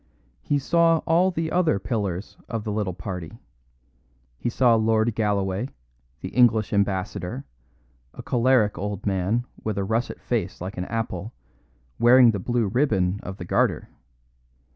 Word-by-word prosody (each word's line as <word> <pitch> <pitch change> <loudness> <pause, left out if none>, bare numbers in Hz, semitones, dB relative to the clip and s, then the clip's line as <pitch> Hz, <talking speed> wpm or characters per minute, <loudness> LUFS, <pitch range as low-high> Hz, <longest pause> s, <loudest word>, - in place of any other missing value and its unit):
He 145 - 0
saw 165 +3 +3
all 175 +3 +3
the 165 -3 -3
other 175 - +2
pillars 100 -3 -3
of 115 -3 -3
the 105 - -3
little 105 -4 -2
party; 90 +1 -6 1.0
he - - -1
saw 120 0 +3
Lord 110 0 +2
Galloway, 100 +1 -1 0.5
the - - -5
English 110 -3 +3
Ambassador 100 +4 -1 0.7
a - - -8
choleric 120 -6 +2
old 100 0 -4
man 100 +5 0 0.2
with 110 -2 -2
a 100 - 0
russet 115 +4 -2
face - - -2
like 95 +3 -6
an 90 - -2
apple, 110 -1 -4 0.7
wearing 120 0 +7
the 100 - -3
blue 120 +3 0
ribbon 95 -6 +1
of 95 0 -7
the 90 - -7
Garter. - - 0
110 Hz, 140 wpm, -24 LUFS, 95-120 Hz, 1.0 s, wearing